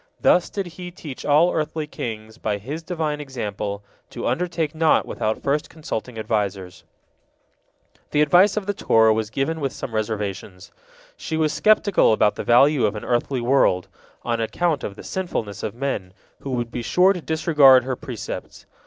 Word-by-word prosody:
Thus 180 - +3
did 200 -2 -3
He 175 +1 -8
teach 155 -6 -9
all 155 +5 +4
earthly 155 0 -2
kings, 110 -6 -7
by 105 -2 -1
His 140 +11 -6
Divine 160 -4 -3
example, 105 -7 -5 0.3
to - - -6
undertake 165 +3 -1
naught 160 0 +3
without 110 0 -3
first 145 +2 0
consulting 125 -7 -6
advisers. 100 -4 -3 1.3
The 150 - +3
advice 185 +6 +4
of 210 - -1
the 205 - -1
Torah 110 - +4
was 110 -1 -2
given 150 +7 -2
with 135 -2 -1
some 120 - -7
reservations. 105 -3 -4 0.5
She 160 - -4
was 155 -1 +1
skeptical 200 - +4
about 105 -1 +3
the - - -5
value 125 0 +4
of 105 - -3
an 105 - -6
earthly 125 +1 0
world, 120 -8 +2 0.3
on 115 -1 -1
account 155 +6 -1
of 100 - -5
the - - -11
sinfulness 110 - -4
of - - -4
men, 120 -8 -3 0.3
who 140 - -7
would 120 -2 -2
be 125 - -4
sure 180 +10 +4
to 180 - -6
disregard 150 -5 +5
her 130 0 -2
precepts. 125 -5 -7
135 Hz, 170 wpm, -22 LUFS, 110-160 Hz, 1.3 s, disregard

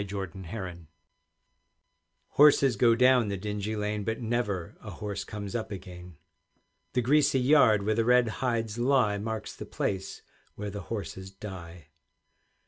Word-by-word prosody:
LINDISFAIRE 95 -3 -6 1.4
Horses 140 -4 +5
go 115 +2 +4
down 125 -1 +4
the 100 -1 -2
dingy 105 +2 -3
lane, 105 0 -2
But 110 +2 -2
never 110 -7 -2
a 110 - -9
horse 100 +1 -5
comes 100 -1 -7
up 110 -2 -3
again. 90 -3 -9 0.8
The 125 - +1
greasy 140 +1 +3
yard 125 -6 +5
where 110 +2 +1
the 115 +1 +1
red 125 0 +4
hides 115 -3 -1
lie 120 -5 +2
Marks 110 +1 -5
the - - -8
place 95 -1 -3 0.3
where 105 0 -5
the 100 0 -6
horses 95 -3 -5
die. 90 -5 -10
105 Hz, 135 wpm, -28 LUFS, 95-120 Hz, 1.4 s, Horses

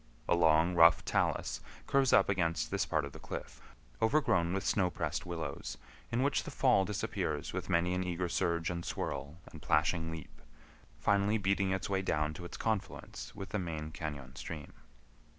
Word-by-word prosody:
A - - +4
long 80 0 +4
rough 85 0 +6
talus - - 0 0.2
curves 135 -2 +3
up 95 - +6
against 85 -5 0
this - - 0
part 80 -2 +1
of 70 - -7
the - - -11
cliff, - - -7 0.4
overgrown 110 - +3
with 95 +1 -2
snow 95 -3 +2
pressed - - -3
willows, 80 -5 -4 0.3
in 120 +2 +1
which 140 - +2
the - - -7
fall 125 -8 +3
disappears 80 -7 -2
with 95 0 -4
many 90 0 +2
an 90 0 0
eager 90 0 -1
surge 85 0 0
and 85 -1 -4
swirl 70 0 -4
and - - -11
plashing 80 +2 +2
leap, 80 -3 -9 0.6
finally 100 +2 +2
beating 100 -1 +1
its 95 0 -1
way 95 -1 0
down 75 -4 0
to 90 +3 -8
its - - -7
confluence 110 -3 -3
with 95 -1 -7
the 105 - -1
main 80 -3 -4
cañon 70 -5 -6
stream. 75 -4 -7
85 Hz, 175 wpm, -33 LUFS, 80-95 Hz, 0.6 s, rough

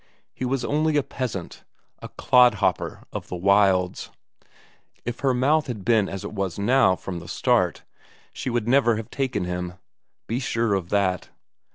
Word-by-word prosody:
He 130 - -4
was 130 0 -1
only 155 +1 +1
a 145 - +2
peasant, 115 -11 -5 0.4
a - - -9
clodhopper 105 -7 +2
of - - -5
the - - -5
wilds; 95 -1 +2 1.0
if 120 0 -4
her 135 - +2
mouth 145 +5 +2
had 110 -7 -6
been 110 -3 +3
as 95 - -6
it - - -6
was 95 -4 -3
now 105 -1 +3
from 90 -1 -6
the 85 - -11
start - - +1 0.5
she - - -4
would 120 -2 -1
never 120 -2 +4
have 110 +2 -6
taken 130 -8 -1
him; 90 0 -4 0.5
be 115 +3 -2
sure 115 -5 0
of 95 -3 -2
that. 95 -3 0
110 Hz, 165 wpm, -24 LUFS, 95-130 Hz, 1.0 s, never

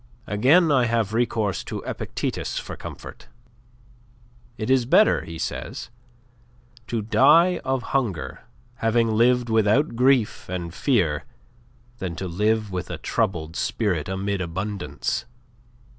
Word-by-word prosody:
Again 145 - +4
I 130 -4 +4
have 115 -3 0
recourse 110 -5 0
to - - -5
Epictetus - - -3
for - - -5
comfort. - - -10 1.3
'It 110 - -3
is 130 -2 +3
better,' 210 +10 +4
he 80 0 -7
says, 120 - -5 1.0
'to 115 -4 -2
die 160 - +5
of 130 -1 -2
hunger 115 - -1 0.4
having 115 0 +2
lived 120 +2 +3
without 110 +5 +2
grief 125 -5 +2
and 85 -2 -4
fear, 90 - +1 0.7
than 90 -3 -4
to 95 +3 -4
live 105 +4 0
with 90 -2 -4
a - - -4
troubled 80 -3 -2
spirit 90 -8 -1
amid 95 +1 -2
abundance. 90 - -3
110 Hz, 120 wpm, -24 LUFS, 95-125 Hz, 1.3 s, die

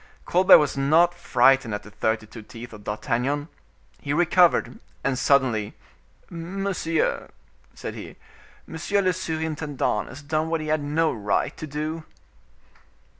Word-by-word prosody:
Colbert 185 +2 +7
was 150 -2 0
not 160 +6 +3
frightened 135 -9 +3
at 105 - -7
the 105 - -13
thirty 110 +1 -1
two 110 +1 -11
teeth 115 +2 -11
of 105 -1 -12
D'Artagnan. 130 +8 -2 0.5
He 140 - -2
recovered, 175 +2 +3 0.2
and 135 - 0
suddenly,—"Monsieur," 165 - -2 0.5
said - - -6
he, - - -9 0.5
"monsieur 195 +5 -1
le 185 -1 +2
surintendant 160 - -2
has 145 +3 -11
done 155 +2 -1
what 165 0 0
he 155 0 -5
had 155 0 +1
no 155 +3 0
right 105 -3 -1
to 155 - -7
do." 155 +2 -4
150 Hz, 130 wpm, -24 LUFS, 125-165 Hz, 0.5 s, Colbert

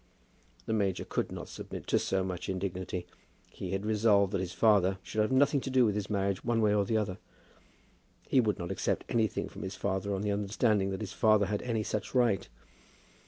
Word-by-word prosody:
The 110 - -1
major 100 -4 0
could - - -2
not - - -6
submit - - -8
to - - +2
so 95 -1 0
much 90 -2 -4
indignity. 95 -1 -3 0.5
He 95 - -6
had 95 +2 -2
resolved 105 -2 +3
that 95 - 0
his 90 -1 -4
father 95 -3 +3
should 110 - -1
have 105 - +1
nothing 140 +1 +3
to 135 - -4
do 130 -2 +4
with 105 - +2
his 105 -1 -3
marriage 100 -2 -1
one 120 -1 +1
way 105 -2 +3
or 100 -1 +2
the 110 +3 +1
other. 100 -2 -2 1.1
He 130 - +4
would 105 -3 0
not 85 -2 -4
accept - - -1
anything 110 -2 0
from - - -10
his 95 +1 -5
father 100 0 -1
on 95 - -3
the 105 - 0
understanding 100 0 +1
that 95 +2 -4
his 105 - -5
father 110 -2 +4
had 105 +1 -2
any 115 -3 -1
such 105 +4 -4
right. 120 -6 +2
105 Hz, 210 wpm, -30 LUFS, 95-110 Hz, 1.1 s, do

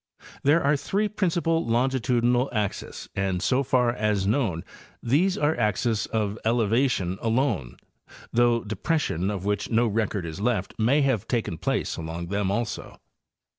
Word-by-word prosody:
—There 150 +5 +3
are 140 +2 +3
three 200 +9 0
principal 170 -5 0
lonei 130 +2 +1
tudinal 120 +2 +2
axes, 105 -4 -3
and 95 -2 0
so 125 +8 +2
far 125 -2 +2
as 105 -4 0
known, 100 - 0 0.4
these 165 +11 +2
are 150 +2 +2
axes 110 0 0
of 105 -1 -2
elevation 115 -4 +1
alone, 115 - 0 0.6
though 120 -1 +3
depression 105 - -1
of 100 -2 -4
which 105 -1 -1
no 115 +1 +3
record 105 -4 -1
is 85 +4 -6
left 105 -4 0
may 130 +7 +3
have 130 -8 +1
taken 110 -10 -2
place - - -1
along 80 +1 -5
them 100 -1 0
also. 110 +2 -3
115 Hz, 145 wpm, -25 LUFS, 100-130 Hz, 0.6 s, There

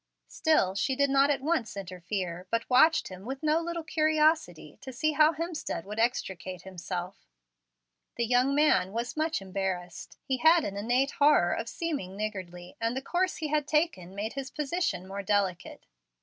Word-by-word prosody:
Still 310 - +2
she 200 +7 0
did 280 0 +2
not 275 +1 +4
at 285 -2 +1
once 285 -10 -1
interfere, 180 -1 -5
but 230 +1 -1
watched 315 -1 +5
with 260 - -7
no 310 +1 +3
little 340 0 -4
curiosity, 310 - +1
to 260 - -8
see 310 +5 0
how 305 +1 +5
Hemstead 325 - -4
would 210 +2 -6
extricate 185 -6 -2
himself. 180 0 -6 0.9
The 235 - 0
young 250 +4 +2
man 290 -10 +3
was 235 +2 -3
much 315 -8 -1
embarrassed. 185 -3 -4
He 265 - -1
had 320 +5 +5
an 200 - -4
innate 245 +7 +1
horror 285 -12 +4
of 230 - -3
seeming 280 - -4
niggardly, 185 -4 -6
and 230 +3 0
the - - -2
course 365 +5 0
he 310 -1 -4
had 300 -1 0
taken 300 - 0
made 210 +3 -3
his 270 -1 -5
position 300 - -2
more 195 +1 -5
delicate. 195 -3 -1
240 Hz, 165 wpm, -29 LUFS, 190-305 Hz, 0.9 s, watched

